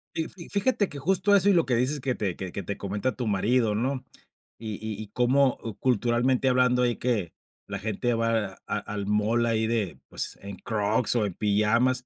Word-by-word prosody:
Fi 160 0 -2
fi 170 -3 -11
fíjate 205 0 +1
que 145 - -9
justo 190 +7 +2
eso 200 0 +4
y 200 - +5
lo 170 -2 +3
que 125 - +1
dices 130 +5 +1
que 130 -1 -1
te, 95 -5 -2
que 95 -2 -6
que 100 - -4
te 100 +3 -4
comenta 105 +6 -2
tu 120 -2 -2
marido 110 +2 +2
¿no?, 130 +4 -2 0.5
y 110 -2 -5
y 110 +2 -5
y 110 - -7
como, 125 +3 +3
o 115 -4 -6
culturalmente 125 +2 +1
hablando, 125 -1 +3
ahí 120 -1 +2
que, 110 -9 -1 0.3
la 100 0 -4
gente 110 +3 -1
va 115 -4 -1
a 105 - -1
al 105 -1 -5
mall 105 +3 +2
ahí 110 -1 +1
de, 110 -6 -1
pues, - - -3
en 100 0 -7
Crocs 110 +2 0
o 110 - +2
en 100 - -3
pijamas. 110 +6 +2
115 Hz, 210 wpm, -26 LUFS, 105-130 Hz, 0.5 s, y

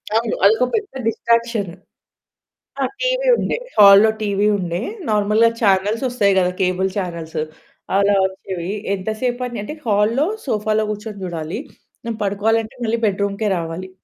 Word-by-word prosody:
అవును. 225 0 +1
అదొక 220 +5 +5
పెద్ద 420 -2 -3 0.2
డిస్ట్రాక్షన్. 230 -2 0 1.1
ఆ - - +2 0.2
టీవీ - - 0
ఉండే - - -1 0.2
హాల్లో 200 +1 +8
టీవీ 205 0 +1
ఉండే. 175 -1 -3 0.3
నార్మల్‌గా 210 +2 +3
చానెల్సొస్తాయి 210 +2 +2
గదా! 180 -1 +2
కేబుల్ 185 +1 +1
చానెల్స్ 170 -5 -4 0.6
అలా 200 0 +3
వచ్చేవి. 190 -2 -5 0.3
ఎంత 190 +2 -5
సేపని 245 -2 -2
అంటే 255 - -6
హాల్లో 220 +6 +2 0.2
సోఫాలో 215 -3 0
కూర్చొని 210 -1 -7
చూడాలి. 165 +2 -4 0.5
నేను 230 -2 -3
పడుకోవాలంటే 220 +4 0
మళ్ళీ 230 +1 0
బెడ్‌రూమ్‌కే 200 +1 -1
రావాలి. 170 +3 -5
210 Hz, 125 wpm, -20 LUFS, 190-225 Hz, 1.1 s, హాల్లో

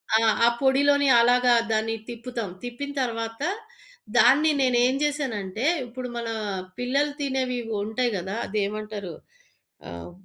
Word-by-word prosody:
ఆ! - - +7 0.3
ఆ - - +6
పొడిలోని 285 +1 +3
అలాగా 245 +1 +4 0.2
దాన్ని 220 +1 0
తిప్పుతాం, 235 -2 -5
తిప్పిన 245 +4 -5
తర్వాత 230 -1 -3 0.8
దాన్ని 270 +7 +6
నేనేం 250 0 +3
జేసానంటే, 245 -7 -2 0.2
ఇప్పుడు 250 +1 -7
మన 235 -1 -4 0.5
పిల్లలు 275 +4 +1
తినేవి 260 -3 -1 0.2
ఉంటాయి 230 +3 -1
గదా! 190 +4 -4
అది 210 +1 -2
ఏమంటారు, 210 -3 -6 0.8
ఆహ్, 85 - -8
245 Hz, 115 wpm, -25 LUFS, 220-265 Hz, 0.8 s, ఆ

